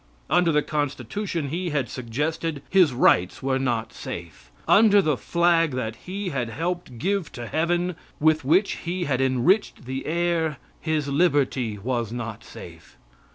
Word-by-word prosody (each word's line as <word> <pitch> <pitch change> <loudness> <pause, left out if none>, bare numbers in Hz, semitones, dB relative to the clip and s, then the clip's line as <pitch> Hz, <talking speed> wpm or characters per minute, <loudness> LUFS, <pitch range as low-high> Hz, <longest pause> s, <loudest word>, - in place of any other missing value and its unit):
Under 175 -2 +4
the 150 -1 +2
Constitution 145 - -3
he 175 +4 -2
had 140 -5 -1
suggested, 150 +5 -3
his 185 -6 +5
rights 90 -7 +3
were 135 0 +1
not 120 -4 -1
safe; 85 -2 -8 0.2
under 205 -1 +6
the 155 -7 +2
flag 170 +1 +2
that 110 -3 -3
he 195 +1 -3
had 130 -7 -2
helped 165 0 -4
give 195 - -1
to 120 - -6
heaven, 175 +5 0 0.2
with 155 0 +3
which 175 +9 +2
he 180 +1 -3
had 135 -4 0
enriched 135 - +2
the 130 +1 -4
air, 165 -2 0 0.2
his 155 -3 -1
liberty 140 -7 +1
was 115 +1 -2
not 115 -3 -5
safe. - - -12
150 Hz, 150 wpm, -24 LUFS, 130-175 Hz, 0.2 s, under